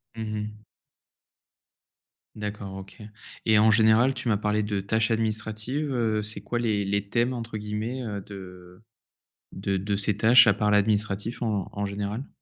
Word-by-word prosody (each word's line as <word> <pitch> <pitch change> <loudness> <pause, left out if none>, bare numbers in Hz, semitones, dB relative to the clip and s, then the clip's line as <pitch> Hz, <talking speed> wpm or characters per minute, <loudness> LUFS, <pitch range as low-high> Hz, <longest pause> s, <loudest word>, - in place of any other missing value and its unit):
Mmh 110 - -4
mh. 105 0 -6 1.7
D'accord, 105 -2 -5
OK, 95 0 -10 0.5
et 110 -1 +5
en 110 +1 +6
général, 110 +4 +5
tu 125 - -5
m'as 105 -3 +3
parlé 105 0 0
de 105 -1 -1
tâches 110 +3 0
administratives, 110 +5 -2
heu, 110 -4 +1
c'est 105 +1 -5
quoi 120 - -2
les 105 -4 0
les 100 0 -1
thèmes, 120 +3 +1
entre 115 -2 -5
guillemets, 110 +5 -4
heu, 100 -3 -4
de 90 -1 -12 0.7
de 95 0 -1
de 100 +2 -1
ces 100 0 +2
tâches, 120 +2 +7
à 105 - +6
part 105 0 0
l'administratif, 105 +2 +1
en 105 -5 -1
en 100 0 -3
général? 100 +6 -4
105 Hz, 160 wpm, -26 LUFS, 100-110 Hz, 1.7 s, tâches